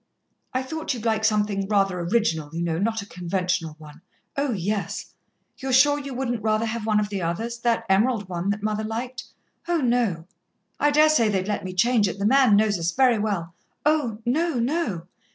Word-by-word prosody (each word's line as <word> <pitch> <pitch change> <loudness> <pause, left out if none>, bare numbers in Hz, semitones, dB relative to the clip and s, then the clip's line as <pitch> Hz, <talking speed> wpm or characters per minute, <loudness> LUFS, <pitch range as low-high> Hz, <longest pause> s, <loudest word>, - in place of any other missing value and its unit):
"I 255 +1 -1
thought 315 0 -3
you'd 235 -1 -7
like 220 -1 +1
something 210 -2 +1
rather 195 -3 +1
original, 170 -5 0
you 170 - -1
know, 165 -1 -1
not 220 +1 -1
a - - -11
conventional 180 -3 -2
one." 155 0 -14 0.3
"Oh, 280 -1 0
yes!" 205 0 -3 0.5
"You're 270 -1 -3
sure 290 +3 +5
you 280 -2 -6
wouldn't 245 -3 -2
rather 215 +1 +1
have 225 -1 -4
one 215 -1 +3
of 205 -1 -1
the 200 -2 -3
others 225 +8 -3
that 230 -1 0
emerald 210 +1 +2
one 180 +1 -3
that 205 0 -2
mother 215 0 -1
liked?" 245 +3 -5 0.4
"Oh, 345 0 +2
no." 235 - 0 0.5
"I 295 - +4
dare 300 +1 +5
say 235 -8 +3
they'd 190 -2 -1
let 210 - -2
me 185 -1 -5
change 225 +1 +3
it, 190 - -4
the 200 - -2
man 255 -2 +5
knows 205 -2 +2
us 170 +1 0
very 250 0 +3
well." 190 -6 -2 0.3
"Oh, 295 -8 +1
no, 315 +6 +1
no." 235 - -1
215 Hz, 195 wpm, -24 LUFS, 190-245 Hz, 0.5 s, sure